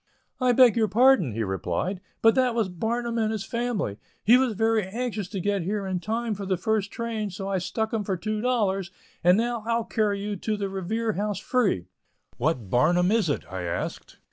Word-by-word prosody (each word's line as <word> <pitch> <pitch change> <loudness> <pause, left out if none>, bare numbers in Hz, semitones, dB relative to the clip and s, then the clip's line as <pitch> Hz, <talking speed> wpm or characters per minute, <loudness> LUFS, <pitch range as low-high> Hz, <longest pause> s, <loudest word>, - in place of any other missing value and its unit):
"I 255 -1 +3
beg 245 -3 +6
your 225 -2 +3
pardon," 230 - +4
he 115 +1 -1
replied, 95 - -2 0.2
"but 225 0 +7
that 255 -3 +2
was 220 -5 +1
Barnum 235 +5 -2
and 220 -1 +1
his 220 -1 -3
family. 235 - -2 0.2
He 230 - +7
was 250 -3 +2
very 225 +1 +2
anxious 215 0 -3
to 195 0 -5
get 200 +1 0
here 200 +3 -2
in 185 -1 -2
time 225 +4 -2
for 200 -1 -6
the 185 -1 +1
first 215 0 0
train, 225 -2 -3
so 195 +1 -6
I 195 -1 0
stuck 220 +5 -2
him 220 -2 0
for 190 -2 -2
$2, 210 -2 0 0.3
and 180 +2 +6
now 235 0 -1
I'll 230 -1 +1
carry 210 -2 0
you 205 0 -3
to 215 +3 -2
the 200 -1 -2
Revere 215 +4 -2
House 205 +1 -2
free." 205 - 0 0.5
"What 130 -6 0
Barnum 175 +8 +3
is 220 -7 +2
it?" 145 - -1
I 95 - -3
asked. 85 -1 -4
210 Hz, 200 wpm, -26 LUFS, 185-230 Hz, 0.5 s, but